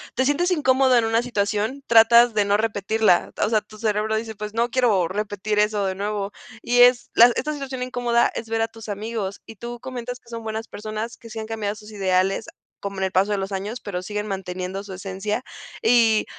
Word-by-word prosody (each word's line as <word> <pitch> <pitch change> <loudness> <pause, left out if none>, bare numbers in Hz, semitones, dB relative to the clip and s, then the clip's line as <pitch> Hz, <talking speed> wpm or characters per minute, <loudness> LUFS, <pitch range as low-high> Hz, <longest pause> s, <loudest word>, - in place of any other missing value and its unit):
te 260 - +2
sientes 290 +7 +2
incómodo 265 -5 +3
en 235 - +3
una 225 +1 +2
situación 220 +3 -1
tratas 235 +1 +6
de 210 -1 +2
no 200 0 +2
repetirla. 215 -2 +1
O - - -1
sea, 220 -1 +3
tu 215 0 -16
cerebro 215 0 0
dice: 220 0 -3
"Pues, 210 0 -7
no 235 +1 +1
quiero 215 -10 +2
repetir 210 +1 -2
eso 210 -1 +2
de 190 -1 -1
nuevo". 200 0 -3 0.3
Y 245 0 +1
es 245 0 +6
la 235 - +9
esta 300 - -1
situación 285 -2 -5 0.2
incómoda, 245 -1 +1
es 225 - -5
ver 225 0 -1
a 225 - +2
tus 225 -1 -11
amigos, 205 -1 -4
y 225 - -10
tú 240 +3 -7
comentas 245 -1 -6
que 235 - -21
son 230 -1 -6
buenas 220 0 -4
personas, 215 +2 -6
que 230 -1 -13
sí 225 - -5
han 220 - -5
cambiado 215 -2 -2
sus 215 0 -13
ideales, 190 0 +1 0.3
como 200 -1 -5
en 190 - +1
el 190 - -2
paso 195 +3 +2
de 205 - 0
los 195 +1 -4
años, 205 +5 -4
pero 180 -3 -5
siguen 210 +1 -4
manteniendo 190 0 -4
su 200 -2 -9
esencia, 195 +5 -4 0.4
y 225 -2 +4
220 Hz, 215 wpm, -23 LUFS, 200-235 Hz, 0.4 s, la